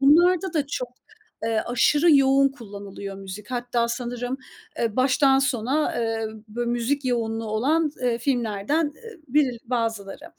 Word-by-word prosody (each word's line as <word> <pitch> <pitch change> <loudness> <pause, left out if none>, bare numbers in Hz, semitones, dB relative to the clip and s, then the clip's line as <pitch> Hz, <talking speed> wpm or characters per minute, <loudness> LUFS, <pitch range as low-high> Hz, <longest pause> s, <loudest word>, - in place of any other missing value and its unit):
Bunlarda 350 +6 +5
da 300 -4 0
çok, 250 -3 -3 0.6
eee, 225 -1 +1
aşırı 290 +6 +4
yoğun 275 0 +5
kullanılıyor 200 -5 -8
müzik. 195 +2 -9
Hatta 245 -1 0
sanırım, 245 +1 -3 0.4
eee, 225 -2 -1
baştan 270 +1 +4
sona, 270 +2 0
eee, 225 -1 -1 0.2
bö 240 +3 -3
müzik 240 +4 0
yoğunluğu 225 -3 -1
olan, 290 +9 +1
eee, 240 -2 +1
filmlerden 245 +4 0
eee, 460 -5 -12
biril 260 -3 +2
bazıları. 225 0 -3
245 Hz, 135 wpm, -24 LUFS, 225-280 Hz, 0.6 s, Bunlarda